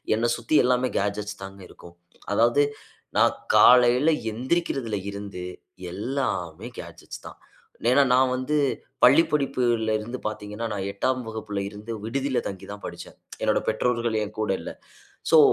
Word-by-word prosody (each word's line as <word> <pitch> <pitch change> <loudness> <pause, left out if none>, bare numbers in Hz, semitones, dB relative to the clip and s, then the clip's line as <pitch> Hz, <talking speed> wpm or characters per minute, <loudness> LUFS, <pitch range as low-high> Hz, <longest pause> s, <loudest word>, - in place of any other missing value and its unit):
என்ன 115 +2 +1
சுத்தி 120 +6 +1
எல்லாமே 125 0 +2
கேட்ஜெட்ஸ் 105 0 -2
தாங்க 95 0 -9
இருக்கும். 85 0 -15 0.4
அதாவது, 120 +6 +4 0.5
நான் - - +4 0.2
காலையில 125 +4 +6 0.2
எந்திரிக்கிறதுல 130 - -1
இருந்து, 100 -3 -7 0.5
எல்லாமே 105 - -3
கேட்ஜெட்ஸ் - - -10
தான்." - - -12 0.5
ஏன்னா 140 +2 +6
நான் 130 0 +4
வந்து 130 +4 -1 0.5
பள்ளிப்படிப்புல 130 -6 +3
இருந்து 120 +4 -5
பார்த்தீங்கன்னா, 105 +1 -5
நான் 100 -1 -3
8 130 +6 0
வகுப்புல 110 -2 -4
இருந்து 105 +3 -9
விடுதில 135 +2 -1
தங்கிதான் 100 +1 -9
படிச்சேன். - - -10 0.3
என்னோட - - +2
பெற்றோர்கள் 115 0 0
என் 105 +1 -8
கூட 105 - 0
இல்ல. - - -6 0.6
ஸோ, 160 - +8
115 Hz, 130 wpm, -25 LUFS, 105-130 Hz, 0.6 s, ஸோ